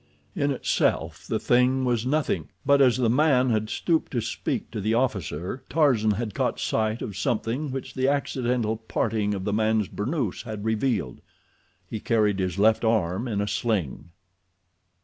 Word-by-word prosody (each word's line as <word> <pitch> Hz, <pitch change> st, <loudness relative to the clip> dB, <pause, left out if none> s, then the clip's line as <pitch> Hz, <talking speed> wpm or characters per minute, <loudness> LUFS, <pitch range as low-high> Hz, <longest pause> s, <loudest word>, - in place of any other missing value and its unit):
In 145 Hz, -5 st, +1 dB
itself 135 Hz, -, 0 dB
the 110 Hz, -, 0 dB
thing 125 Hz, +3 st, +2 dB
was 120 Hz, -1 st, 0 dB
nothing, 150 Hz, +2 st, 0 dB, 0.2 s
but 140 Hz, 0 st, +5 dB
as 130 Hz, -3 st, +5 dB
the 125 Hz, -2 st, +2 dB
man 130 Hz, 0 st, +3 dB
had 110 Hz, -1 st, 0 dB
stooped 165 Hz, -2 st, 0 dB
to 120 Hz, -, +1 dB
speak -, -, -3 dB
to 105 Hz, -, -4 dB
the 110 Hz, +3 st, +1 dB
officer, 100 Hz, -, -2 dB
Tarzan 130 Hz, -9 st, +3 dB
had 105 Hz, 0 st, -1 dB
caught -, -, -1 dB
sight 110 Hz, +1 st, -1 dB
of 100 Hz, -, -5 dB
something 115 Hz, +8 st, -1 dB
which 135 Hz, 0 st, -5 dB
the 130 Hz, 0 st, 0 dB
accidental 125 Hz, -5 st, 0 dB
parting 110 Hz, -2 st, -1 dB
of 95 Hz, -, -4 dB
the 105 Hz, -, -1 dB
man's 110 Hz, -1 st, +2 dB
burnoose 120 Hz, -, -2 dB
had 110 Hz, -3 st, -6 dB
revealed—he 110 Hz, -, -4 dB
carried 105 Hz, -3 st, +1 dB
his 90 Hz, -1 st, -1 dB
left 110 Hz, +3 st, +3 dB
arm 110 Hz, -1 st, +1 dB
in 105 Hz, -3 st, -1 dB
a 105 Hz, -, -1 dB
sling. 100 Hz, -, -2 dB
110 Hz, 160 wpm, -25 LUFS, 105-130 Hz, 0.2 s, but